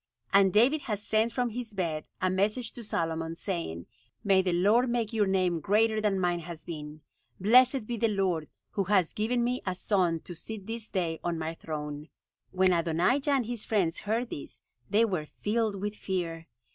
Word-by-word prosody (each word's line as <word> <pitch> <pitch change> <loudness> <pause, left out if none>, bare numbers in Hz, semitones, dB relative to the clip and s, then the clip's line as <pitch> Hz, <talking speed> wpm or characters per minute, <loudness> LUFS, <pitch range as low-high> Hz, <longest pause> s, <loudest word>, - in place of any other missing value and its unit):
And 195 -1 +6
David 250 +9 +4
has 210 -1 -1
sent 220 +2 +2
from 245 -1 -1
his 230 -2 -6
bed 165 -5 -2
a 185 - +1
message 210 +6 0
to 240 - -8
Solomon, 165 -4 -2
saying, 165 - -4 0.4
'May 195 -2 +4
the 185 -1 0
Lord 210 +8 +3
make 235 -2 -1
your 210 -3 +2
name 185 -3 +1
greater 215 +5 +2
than 205 -3 +1
mine 175 -1 +1
has 170 -1 -8
been! 155 -2 -7 0.4
Blessed 250 +4 +5
be 235 +1 -3
the 230 - +2
Lord, 190 -7 0 0.2
who 195 - -1
has 190 -3 +2
given 235 +3 0
me 250 +1 0
a 185 -1 -2
son 180 -4 +1
to 175 - -8
sit 205 +4 -7
this 225 0 -5
day 170 -4 -1
on 170 -1 -1
my 160 0 -3
throne!'" 150 -2 -6 0.4
When 185 0 +3
Adonijah 175 - +1
and 270 -4 +2
his 235 -1 -4
friends 185 -6 +1
heard 230 +3 -2
this - - -7 0.3
they 220 +3 +4
were 180 -8 -2
filled 215 +3 -1
with 205 +1 -2
fear. 170 -5 -3
195 Hz, 185 wpm, -29 LUFS, 170-225 Hz, 0.4 s, And